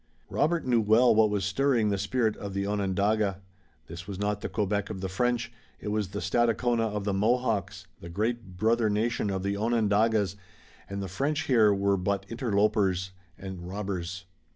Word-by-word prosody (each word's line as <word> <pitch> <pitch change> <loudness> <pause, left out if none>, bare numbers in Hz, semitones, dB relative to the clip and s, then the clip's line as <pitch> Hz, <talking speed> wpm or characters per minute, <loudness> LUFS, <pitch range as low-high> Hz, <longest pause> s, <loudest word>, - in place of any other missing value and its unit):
Robert 170 +2 +1
knew 120 -3 +3
well 110 +4 +5
what 110 0 +4
was 100 -2 -1
stirring 115 +1 +2
the 100 - 0
spirit 110 +2 0
of 100 -1 -6
the 100 0 -1
Onondaga. 100 0 0 0.5
This 85 +2 -9
was 100 -2 -5
not 105 +1 -1
the - - -4
Quebec 105 -1 -1
of 105 -3 -5
the 95 - -3
French, 115 +4 -1 0.3
it 105 - -5
was 105 -1 0
the 100 +3 -5
Stadacona 115 +3 +1
of 105 -1 -3
the 100 0 -1
Mohawks, 110 0 0
the 85 - -9
great 105 0 -3
brother 110 +2 +2
nation 105 0 0
of 95 -1 -2
the 100 0 -1
Onondagas, 105 -2 +1 0.5
and 100 0 -4
the - - -4
French 140 - -1
here 115 -7 +4
were 100 0 +2
but 100 +1 -1
interlopers 100 -5 +1 0.3
and 95 -2 -7
robbers. 95 -2 -4
105 Hz, 175 wpm, -28 LUFS, 95-115 Hz, 0.5 s, well